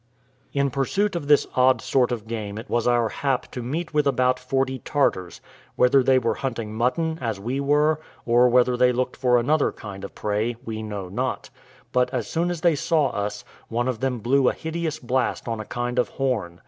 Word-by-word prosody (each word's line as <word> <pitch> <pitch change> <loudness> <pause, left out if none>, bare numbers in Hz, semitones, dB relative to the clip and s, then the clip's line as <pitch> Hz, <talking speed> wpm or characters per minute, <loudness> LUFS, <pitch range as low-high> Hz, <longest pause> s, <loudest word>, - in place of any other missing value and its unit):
In 140 -1 0
pursuit 190 +10 0
of 155 -5 -3
this 145 -1 +5
odd 130 -1 +4
sort 125 +1 +1
of 115 -3 -3
game 110 -2 -5
it 115 +4 -7
was 120 0 0
our 120 -2 +3
hap 135 0 -2
to 125 - -5
meet 155 +8 -4
with 150 -1 +2
about 130 -1 +2
forty 130 +1 -1
Tartars: 95 - -1 0.3
whether 130 +2 +5
they 130 0 +4
were 115 -3 +1
hunting 115 -4 -4
mutton, 160 +8 0
as 115 -5 -2
we 125 +7 -3
were, 150 +2 +2 0.2
or 120 +1 +5
whether 125 0 +4
they 125 0 +4
looked 125 +1 -1
for 125 -2 +3
another 145 +5 +2
kind 100 -3 -9
of 100 - -8
prey, 105 +3 -1
we 110 -1 -4
know 105 -3 -5
not; 90 - -3 0.4
but 125 0 +2
as 125 -4 -2
soon 170 +2 0
as 175 -3 -3
they 170 -1 +4
saw 150 -1 +1
us, 105 0 -4 0.2
one 120 +2 -1
of 125 -4 -2
them 130 -1 -1
blew 130 +3 +3
a - - -2
hideous 160 -1 -3
blast 125 0 -1
on 115 -1 -2
a 110 - -5
kind 120 +2 -2
of 125 - +1
horn. 110 -11 -2
125 Hz, 205 wpm, -24 LUFS, 115-140 Hz, 0.4 s, this